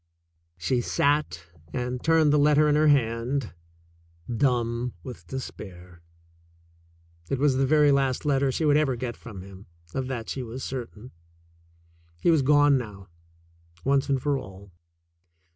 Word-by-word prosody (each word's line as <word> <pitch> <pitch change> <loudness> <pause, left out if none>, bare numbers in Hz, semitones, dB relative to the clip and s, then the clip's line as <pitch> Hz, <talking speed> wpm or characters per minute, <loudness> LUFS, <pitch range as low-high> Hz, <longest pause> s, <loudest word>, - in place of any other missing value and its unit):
She 120 +9 0
sat 140 - 0 0.3
and 125 0 -3
turned 160 -2 +4
the 150 - +4
letter 150 +1 +4
in 150 - +3
her 155 +1 +3
hand, 125 -2 +1 0.8
dumb 120 -2 0
with 125 - -10
despair. 90 -9 -8 1.3
It 135 - 0
was 140 0 +2
the 135 0 +2
very 150 0 +5
last 135 -1 +1
letter 140 -2 +2
she 155 - -1
would 145 -1 +4
ever 145 -4 +1
get 120 0 -4
from 100 -6 -10
him. 100 +1 -13 0.3
Of 130 -1 -2
that 120 -4 -4
she 135 - -4
was 125 +2 -7
certain. 125 -2 -7 1.1
He 170 - +3
was 160 -3 +4
gone 145 0 +4
now, 100 -6 -9 0.7
once 140 +3 +1
and 135 -1 +2
for 140 +1 0
all. 95 -1 -12
130 Hz, 145 wpm, -26 LUFS, 115-145 Hz, 1.3 s, very